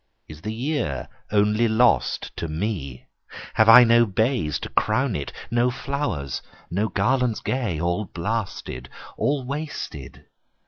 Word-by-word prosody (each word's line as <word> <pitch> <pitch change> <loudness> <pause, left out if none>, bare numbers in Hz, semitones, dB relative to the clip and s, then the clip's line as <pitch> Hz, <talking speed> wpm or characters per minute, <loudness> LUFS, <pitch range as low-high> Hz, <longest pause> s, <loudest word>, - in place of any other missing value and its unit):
Is 75 0 -11
the 110 - -4
year 115 - -2 0.2
only 105 +2 +3
lost 115 +2 +2
to 85 - -3
me? 80 - -4 0.5
Have 110 0 +4
I 125 +2 +11
no 115 0 +5
bays 110 - 0
to - - -5
crown - - +1
it? - - -4 0.2
No 120 +1 +3
flowers, 125 - -3 0.3
no 100 +5 +1
garlands 125 -3 +1
gay? 115 -12 -2
all 85 +5 0
blasted? 95 - -4 0.3
All 140 -3 0
wasted? 140 - -6
110 Hz, 130 wpm, -24 LUFS, 85-125 Hz, 0.5 s, I